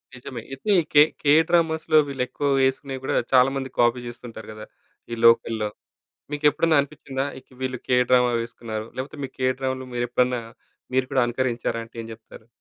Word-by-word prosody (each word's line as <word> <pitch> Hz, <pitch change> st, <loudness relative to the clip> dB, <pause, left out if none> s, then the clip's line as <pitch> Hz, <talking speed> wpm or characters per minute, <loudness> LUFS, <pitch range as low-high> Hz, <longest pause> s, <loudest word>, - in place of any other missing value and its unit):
నిజమే. 120 Hz, -1 st, -8 dB
అయితే 135 Hz, +10 st, -2 dB, 0.2 s
కే 145 Hz, -, +8 dB, 0.2 s
కే 145 Hz, -, +5 dB, 0.2 s
డ్రామాస్‌లో 160 Hz, -2 st, +2 dB
వీళ్ళెక్కువ 135 Hz, +1 st, -2 dB
వేసుకునేవి 130 Hz, 0 st, -1 dB
కూడా -, -, -1 dB, 0.2 s
చాలా 130 Hz, 0 st, +6 dB
మంది 135 Hz, -1 st, -3 dB
కాపీ 120 Hz, +1 st, +4 dB
చేస్తుంటారు 115 Hz, -2 st, -9 dB
కదా! 105 Hz, 0 st, -9 dB, 0.5 s
ఈ -, -, -2 dB
లోకల్‌లో. 115 Hz, -2 st, +4 dB, 0.6 s
మీకెప్పుడన్నా 150 Hz, +2 st, +3 dB
అనిపిచ్చిందా? 140 Hz, -2 st, -5 dB
ఇక 130 Hz, -, -26 dB
వీళ్ళు 130 Hz, -1 st, -2 dB
కే 125 Hz, -, +3 dB
డ్రామా 125 Hz, -1 st, +4 dB
వేసుకున్నారు, 115 Hz, -2 st, -6 dB
లేకపోతే 135 Hz, +3 st, -6 dB
మీ -, -, -9 dB
కే 130 Hz, 0 st, +1 dB
డ్రామలు 130 Hz, -1 st, -3 dB
మీరెప్పుడన్నా 125 Hz, 0 st, 0 dB, 0.5 s
మీరు 130 Hz, 0 st, +2 dB
కూడా 130 Hz, -, +3 dB
అనుకరించారా 120 Hz, -1 st, -1 dB
అంటే 115 Hz, -, -23 dB
ఏం 115 Hz, -, -9 dB
చెప్తారు? 110 Hz, 0 st, -15 dB
130 Hz, 155 wpm, -24 LUFS, 120-135 Hz, 0.6 s, కే